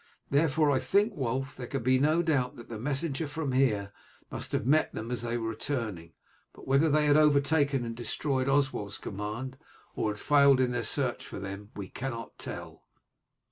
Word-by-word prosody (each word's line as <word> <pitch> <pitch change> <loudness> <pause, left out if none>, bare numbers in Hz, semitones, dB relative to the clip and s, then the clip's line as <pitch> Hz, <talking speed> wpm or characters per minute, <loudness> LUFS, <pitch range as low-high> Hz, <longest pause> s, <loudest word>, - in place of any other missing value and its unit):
Therefore 150 +1 +3
I 130 - +2
think, 200 - +2
Wulf, 135 -2 -2
there 125 - -7
can 135 -4 -3
be 130 +1 +3
no 155 +5 +3
doubt 140 -7 +1
that 120 - -12
the 115 -2 -6
messenger 145 +4 -1
from 145 0 -3
here 110 -7 +1 0.4
must - - -4
have - - -1
met 155 +4 +3
them 110 +2 -5
as 120 -2 -1
they 120 0 -2
were 115 -1 -2
returning; 110 - -4 0.4
but - - -14
whether 140 +4 +4
they 150 +1 +3
had 145 0 +5
overtaken 145 -3 +3
and 115 0 -5
destroyed 130 +2 -1
Oswald's 135 -7 0
command, 110 +7 -5 0.4
or 110 - 0
had 105 0 -4
failed 140 -2 +5
in 125 -1 +2
their 120 -1 -1
search 125 +2 0
for - - -7
them, 100 +1 -7
we 100 -2 -6
cannot 120 -1 -6
tell." - - -7
130 Hz, 185 wpm, -29 LUFS, 115-145 Hz, 0.4 s, had